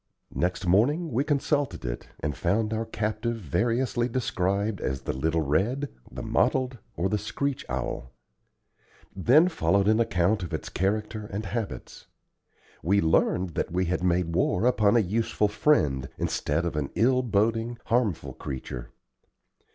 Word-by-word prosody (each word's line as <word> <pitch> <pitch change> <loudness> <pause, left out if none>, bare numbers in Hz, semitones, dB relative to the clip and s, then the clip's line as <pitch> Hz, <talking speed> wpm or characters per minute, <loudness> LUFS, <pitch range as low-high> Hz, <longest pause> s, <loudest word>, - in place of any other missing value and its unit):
Next 90 +1 -1
morning 140 - +3
we 125 +4 +1
consulted 145 - 0
it, - - -4
and 75 -1 -2
found 110 - 0
our 110 +1 -2
captive 110 +1 -2
variously 120 - 0
described 100 -4 -1
as 65 0 -2
the - - -2
little 80 +5 0
red, 115 - 0 0.2
the 65 0 -6
mottled, 130 -2 +1 0.2
or 90 - 0
the 105 +1 0
screech 140 +6 -2
owl. 65 +1 -3 1.0
Then 130 - +5
followed 100 - +2
an 110 +1 +4
account 100 -2 +2
of 85 -2 -3
its - - -6
character 105 +3 -1
and 105 +2 -3
habits. 110 +1 -5 0.7
We 100 +4 +3
learned 90 +2 +2
that - - -2
we 90 +1 +1
had 90 +1 -1
made 90 -2 +1
war 90 +3 +1
upon 120 -3 +4
a - - +5
useful 105 +2 +1
friend, 75 - +2
instead 75 +4 -1
of 85 - -2
an 70 -3 -1
ill 130 +2 +3
boding, 115 +1 0
harmful 115 -7 0
creature. 65 -3 -6
105 Hz, 145 wpm, -27 LUFS, 85-120 Hz, 1.0 s, Then